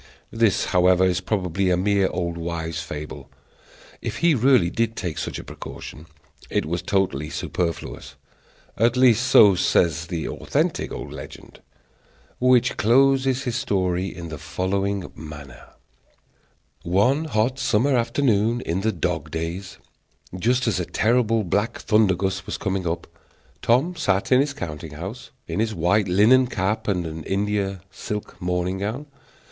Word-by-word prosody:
This, 115 -4 +2
however, 90 0 +4
is 90 0 +1
probably 95 -1 -1
a 90 - +3
mere 100 +1 +2
old 85 -1 -3
wives' 85 0 -4
fable. 75 -3 -7 0.7
If - - -4
he 170 - +6
really 125 -8 +4
did 115 0 -1
take 85 -7 -4
such - - -4
a - - -7
precaution, 80 +2 -9 0.4
it - - 0
was 85 +2 -2
totally 90 -6 0
superfluous; 85 -2 -4 0.6
at 120 +3 +3
least 125 -1 +4
so 105 -6 +7
says 85 -2 +1
the 85 -2 -3
authentic - - -1
old - - -6
legend, - - -11 0.8
which 125 -1 +3
closes 135 +3 +3
his 125 -3 -2
story 95 -2 0
in 85 -3 -7
the 75 -2 -7
following 95 +2 -2
manner: 75 -4 -11 1.1
One 125 - +2
hot 130 -1 0
summer 125 +2 +2
afternoon 115 -2 +1
in 90 -1 -2
the 110 +2 +1
dog 90 -6 -2
days, 85 +2 -5 0.6
just 125 +7 +1
as 100 -6 +1
a 90 - -2
terrible 115 +1 +2
black 105 +6 -1
thunder 105 -4 +3
gust 95 0 -3
was - - -3
coming 95 -2 -2
up, 85 +1 -2 0.6
Tom 135 +10 +2
sat 100 - 0
in 130 - +6
his 140 0 -1
counting 80 - -6
house, 95 +11 -7 0.2
in 85 +4 -3
his 110 0 0
white 95 +5 +2
linen 110 +8 +5
cap 100 -1 -2
and 85 -5 -2
India 100 -1 -1
silk 105 +1 -6
morning 90 +1 -1
gown. 110 +9 -3
95 Hz, 145 wpm, -23 LUFS, 85-115 Hz, 1.1 s, so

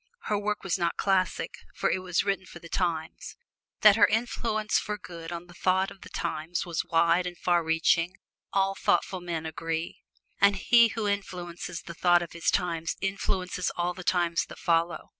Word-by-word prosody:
Her 210 -1 0
work 210 0 -2
was 190 -1 -1
not 170 -1 0
classic, 190 -2 0 0.2
for - - +1
it - - 0
was 185 -1 0
written 195 -2 -1
for - - -11
the 170 - -11
times. 165 -3 -2 0.5
That 215 -1 +8
her 205 - +7
influence 220 -1 0
for 210 0 -4
good 170 -3 -9
on 170 0 -5
the 175 - -15
thought 185 +2 +1
of 195 - -14
the - - -11
times 160 +3 -3
was 170 -2 -2
wide 170 +2 +3
and 175 -1 -7
far 175 -1 +2
reaching, 165 +2 +2 0.4
all 195 0 +2
thoughtful 190 -1 0
men 170 -2 -4
agree. 160 +1 -4 0.4
And 200 0 +5
he 235 +4 +5
who 225 -2 -3
influences 180 -4 -4
the 170 - -8
thought 175 0 +4
of 170 - -9
his 170 -1 0
times 165 -3 0
influences 190 -2 -1
all 175 +1 0
the 185 - -9
times 175 -2 +1
that - - -11
follow. 170 -1 0
180 Hz, 185 wpm, -28 LUFS, 170-195 Hz, 0.5 s, That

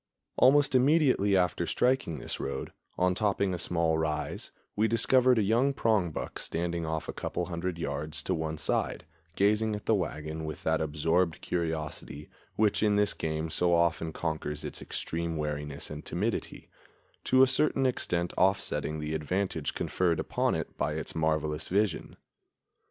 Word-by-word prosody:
Almost 140 +2 +5
immediately 130 -7 +4
after 90 -1 +1
striking 125 - +1
this - - -5
road, - - -4 0.2
on 90 0 +3
topping 100 -1 +1
a 90 - -3
small 85 -2 +1
rise, 75 -2 -2 0.3
we 110 +2 +3
discovered 125 +2 +4
a 110 - +3
young 120 +7 +2
prongbuck 105 - 0
standing 85 0 -2
off 80 0 -3
a - - -4
couple 90 - -3
of 85 - -6
hundred 85 0 -3
yards 75 -1 -4
to - - 0
one 80 -1 -2
side, 75 - -1 0.3
gazing 105 +2 +2
at 105 - -8
the - - +3
wagon 80 -4 -2
with 80 -1 -6
that 80 -1 +1
absorbed 80 +3 +1
curiosity 80 -3 -4 0.2
which 105 -1 +2
in 105 -1 +3
this 105 0 +2
game 80 0 -3
so 85 +1 +3
often 85 -1 +1
conquers 75 -2 -3
its - - -6
extreme 85 0 -3
wariness 75 -1 -4
and 75 0 -6
timidity, 105 +6 -3 0.6
to 130 +1 +5
a - - +6
certain 135 +1 +2
extent 90 -9 0
offsetting 95 -4 +1
the 75 0 -3
advantage 80 +1 -2
conferred 85 -3 0
upon - - 0
it - - -4
by 75 +2 0
its 80 0 -4
marvelous 80 -1 -1
vision. 100 -1 0
85 Hz, 155 wpm, -29 LUFS, 80-105 Hz, 0.6 s, a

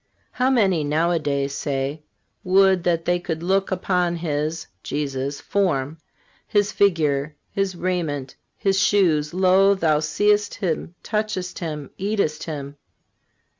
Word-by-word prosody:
How 255 +1 +1
many 195 - +3
nowadays 150 -3 0
say: 140 +1 -2 0.4
'Would 190 -1 +4
that 165 -1 +1
they 175 0 +2
could 165 -2 -4
look 195 +2 +1
upon 180 -2 0
His 155 -1 -2 0.2
(Jesus') 140 -1 -3
form, 160 -6 -1 0.5
His 205 0 +2
figure, 155 -8 +1 0.2
His 195 -2 -1
raiment, 165 -7 -2 0.2
His 195 -1 +1
shoes. 175 -7 +3
Lo! 190 +2 +4
thou 155 -5 +2
seest 205 +7 +1
Him, 170 -2 -3
touchest 210 -4 -2
Him, 150 -5 -5
eatest 195 -6 -1
Him. 145 -3 -6
170 Hz, 120 wpm, -23 LUFS, 150-195 Hz, 0.5 s, Would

